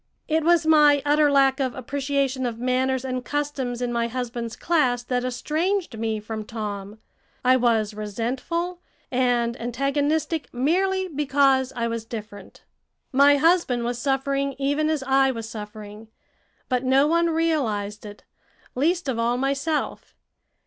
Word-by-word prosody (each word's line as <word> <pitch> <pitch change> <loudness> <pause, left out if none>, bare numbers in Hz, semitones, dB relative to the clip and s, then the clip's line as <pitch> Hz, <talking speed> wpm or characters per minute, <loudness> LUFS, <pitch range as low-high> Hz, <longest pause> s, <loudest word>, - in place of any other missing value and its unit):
It 315 0 +1
was 340 -1 +3
my 295 -3 +5
utter 295 0 +4
lack 270 -1 +4
of 260 -2 -1
appreciation 270 0 -1
of 230 -2 -5
manners 255 +1 0
and 255 -1 -3
customs 270 -4 -3
in 240 -1 -2
my 235 0 0
husband's 235 -1 -4
class 255 -8 +1
that 245 0 -1
estranged 310 - -1
me 220 -1 -1
from 215 +1 -6
Tom. 210 -2 -6 0.5
I 255 +1 +6
was 225 -4 +1
resentful 250 - -3 0.3
and 245 -2 +1
antagonistic 285 +5 -1
merely 375 +9 +1
because 275 -4 +2
I 235 -1 -1
was 230 -1 -3
different. 215 -2 -9 0.5
My 280 +2 +5
husband 320 -6 +2
was 240 0 -2
suffering 275 0 -1
even 285 +3 0
as 310 -3 -1
I 270 0 +3
was 230 -3 -4
suffering; 210 0 -9 0.6
but 250 -1 0
no 265 +2 +4
one 335 +2 +2
realized 245 -11 -1
it, 205 -1 -11 0.5
least 335 +5 0
of 245 -4 -1
all 235 +1 +1
myself. 275 +4 -2
260 Hz, 140 wpm, -24 LUFS, 235-290 Hz, 0.6 s, I